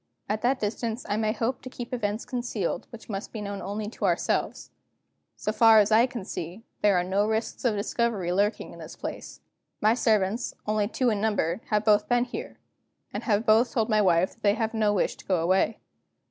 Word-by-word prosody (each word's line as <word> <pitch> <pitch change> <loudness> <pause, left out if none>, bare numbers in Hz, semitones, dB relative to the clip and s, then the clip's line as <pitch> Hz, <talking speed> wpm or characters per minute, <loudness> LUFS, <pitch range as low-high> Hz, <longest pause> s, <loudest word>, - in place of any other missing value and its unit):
At 210 +1 -1
that 255 +2 +2
distance 225 +2 -3
I 205 - 0
may 215 0 +1
hope 235 +3 -2
to 255 - -8
keep 245 0 -8
events 215 -2 -2
concealed 240 -7 -3
which 230 - -12
must 200 -1 -5
be 220 - -6
known 200 -1 -5
only 210 +1 -4
to - - -4
ourselves. - - 0 0.6
So 215 - -2
far 225 0 +6
as 210 0 +5
I 230 +3 +6
can 240 -7 -6
see, 180 +5 -6 0.2
there 205 -3 +4
are 175 - +2
no 195 +3 +1
risks 220 +1 -2
of 230 -3 +3
discovery 205 -3 -1
lurking 205 +3 0
in - - -12
this - - -9
place. - - -7 0.4
My 215 +1 +4
servants 220 -1 +1
(only 210 -1 +1
two 245 +2 +1
in 205 -2 -1
number) 205 -3 0
have 210 -1 +1
both 210 -1 +4
been 245 0 +3
born 245 - -9
here, - - -6 0.6
and - - -4
have 215 -1 +1
both 225 +3 +4
told 225 -2 +1
my 215 -1 +4
wife 180 -1 +3
that - - -28
they 205 0 +3
have 225 -1 -1
no 215 -2 +2
wish 205 - 0
to - - -15
go 190 - +2
away. 185 +6 +2
215 Hz, 215 wpm, -27 LUFS, 205-230 Hz, 0.6 s, far